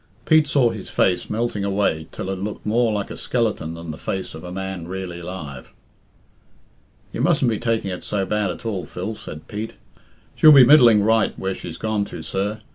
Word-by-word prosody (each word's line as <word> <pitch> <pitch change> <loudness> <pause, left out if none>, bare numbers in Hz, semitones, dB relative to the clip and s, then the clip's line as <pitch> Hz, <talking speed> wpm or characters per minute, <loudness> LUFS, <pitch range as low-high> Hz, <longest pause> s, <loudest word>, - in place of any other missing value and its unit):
Pete 155 -1 +5
saw 135 -5 +3
his 105 - -7
face 90 -1 +1
melting 110 -2 -1
away 95 -6 0
till 95 - -5
it 95 - -4
looked 105 +2 -5
more 115 +2 +2
like 100 -2 -3
a - - -5
skeleton 110 -9 -1
than 85 -1 -7
the 80 - -9
face 95 -1 -4
of 80 - -9
à 90 +1 -8
man 95 -2 -5
really 90 -1 -5
alive. 85 -7 -8 1.4
"You - - -3
mustn't 125 - +3
be 110 - -2
taking 115 -4 -1
it 90 - -6
so 100 -2 -1
bad 105 +1 0
at 90 - -7
all, 95 -7 -3
Phil," 95 +5 -5
said 80 -7 -10
Pete. 110 +2 -5 0.6
"She'll 155 - +7
be 135 -4 +9
middling 120 -7 +7
right 110 0 +2
where 95 0 -2
she's 85 -3 -8
gone 110 -2 -1
to, - - -8
sir. 105 +3 -3
100 Hz, 200 wpm, -22 LUFS, 90-110 Hz, 1.4 s, be